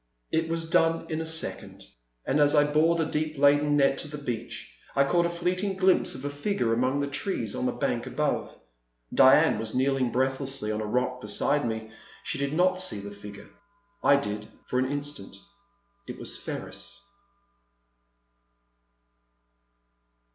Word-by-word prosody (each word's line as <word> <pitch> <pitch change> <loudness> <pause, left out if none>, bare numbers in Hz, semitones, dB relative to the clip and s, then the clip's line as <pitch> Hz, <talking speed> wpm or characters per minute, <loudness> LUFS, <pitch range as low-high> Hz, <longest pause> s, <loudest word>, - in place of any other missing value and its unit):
It 160 0 0
was 165 0 -1
done 165 0 +2
in 155 0 -1
a 160 - -4
second; 160 - -3 0.4
and, 145 - +1
as 145 +1 +4
I 145 - +6
bore 155 +3 +3
the 165 -1 +1
deep 155 0 -2
laden 145 +1 +4
net 135 -1 +3
to - - -5
the 150 0 -7
beach, 120 -5 -6 0.2
I 140 - +5
caught 170 +5 +2
a - - -3
fleeting 180 +3 -1
glimpse 190 -1 +3
of 130 +2 -7
a - - -1
figure 145 - -1
among 130 +4 +1
the 140 - -1
trees 140 - -2
on - - -1
the - - +1
bank - - -2
above. - - -2 0.6
Diane - - +6
was 110 +1 -4
kneeling 130 -1 +1
breathlessly 130 -3 0
on 110 0 -2
a 105 - -3
rock 125 +2 -1
beside 135 +6 +1
me; 110 -1 -4 0.3
she - - -4
did 140 0 -1
not 185 +3 +2
see 185 - -1
the 100 0 -7
figure. 100 0 -11 0.5
I 140 - +6
did, 105 -6 -3 0.2
for 125 - -1
an 130 +1 0
instant. 145 0 -4 0.7
It - - -7
was - - -3
Ferris. - - -6
140 Hz, 160 wpm, -27 LUFS, 125-160 Hz, 0.7 s, I